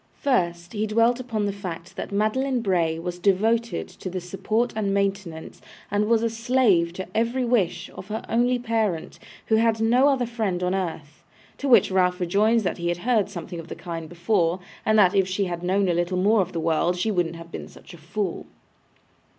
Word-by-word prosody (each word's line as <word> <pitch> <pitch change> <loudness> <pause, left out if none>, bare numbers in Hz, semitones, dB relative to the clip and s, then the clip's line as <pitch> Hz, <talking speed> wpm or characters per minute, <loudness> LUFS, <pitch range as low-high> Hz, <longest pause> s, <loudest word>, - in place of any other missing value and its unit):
First, 175 -10 0
he 215 0 -1
dwelt 230 +3 +3
upon 225 -4 -2
the 200 - -1
fact 180 -3 -7
that - - -6
Madeline 240 +5 0
Bray 170 -6 +1
was 175 +1 -5
devoted 220 +5 +1
to 185 - -8
the 185 +1 -3
support 195 +7 -1
and 205 -2 0
maintenance, 195 -5 -3 0.3
and 205 +1 +1
was 230 0 +3
a 230 - +2
slave 225 -7 +2
to 190 +1 -6
every 235 +3 +1
wish, 225 -8 +1
of 185 - -10
her 215 +1 -4
only 245 +2 +2
parent, 220 -8 -2 0.3
who 220 - +3
had 225 0 +2
no 240 +5 +4
other 265 -3 +2
friend 215 -7 -2
on 180 +1 +1
earth; 160 -6 -4 0.4
to 280 - -2
which 235 - +6
Ralph 180 -1 +2
rejoined 210 +6 +2
that 185 -3 -2
he 170 - -2
had 175 0 0
heard 225 -5 +2
something 175 -2 -7
of 165 - -9
the - - -7
kind 165 -3 -6
before, 175 0 +1 0.3
and 215 0 +4
that 185 -4 +5
if 190 -1 +3
she 190 +2 -1
had 175 -2 -4
known 190 +2 +1
a 175 - +2
little 175 +2 0
more 205 +3 +4
of 185 -1 -3
the 170 - -3
world, 165 +2 +1
she 215 +5 0
wouldn't 175 -4 0
have 165 0 -11
been - - -6
such - - -15
a - - -11
fool. 175 +4 -4
195 Hz, 205 wpm, -24 LUFS, 175-225 Hz, 0.4 s, which